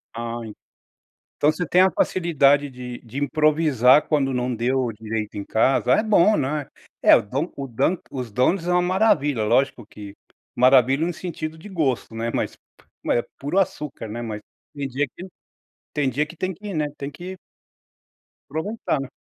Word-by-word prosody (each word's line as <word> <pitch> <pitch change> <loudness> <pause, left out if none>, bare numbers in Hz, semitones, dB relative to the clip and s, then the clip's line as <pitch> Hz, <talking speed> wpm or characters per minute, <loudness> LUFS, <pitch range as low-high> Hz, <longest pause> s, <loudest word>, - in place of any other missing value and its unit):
Ah 115 0 -4
e. 110 - -8 0.9
Então 150 - +4
você 175 +2 -3
tem 180 +5 +3
a 190 0 +6
facilidade 145 -5 +2
de 125 -2 -8
de 120 +1 -12
improvisar 150 -3 +3
quando 135 -4 +1
não 125 0 -1
deu 125 +1 0
direito 110 -1 -5
em 100 - -4
casa, 125 +2 +2
é 215 - +3
bom 215 -1 +4
não 150 +2 0
é? 140 - -7 0.3
É, - - +8
o - - +1
don 135 - -3
o 140 - -4
dunk 135 +8 0
os 125 -4 -5
donuts 145 - +1
é 180 - +2
uma 180 - +3
maravilha, 180 - +2
lógico 130 -1 +1
que 100 -2 -11 0.4
maravilha 130 +4 +4
no 175 - -3
sentido 160 -2 -5
de 160 - -13
gosto, 140 -10 -1
né, 115 +1 -2
mas - - -2 0.5
p - - +1
é 120 - +2 0.2
puro 145 +8 -1
açúcar, 150 -9 -2
né, 115 +3 -5
mas 110 -3 -5 0.3
tem 140 -1 -3
dia 135 +3 -1
que 185 +2 -8 0.7
tem 145 -3 +1
dia 140 +4 0
que 160 +2 -13
tem 185 +3 -2
que, 200 +3 -8
né, 155 -2 0
tem 140 +1 -5
que 185 +5 -8 1.1
aproveitar 160 +1 -2
né? 135 -1 -5
140 Hz, 180 wpm, -23 LUFS, 125-165 Hz, 1.1 s, É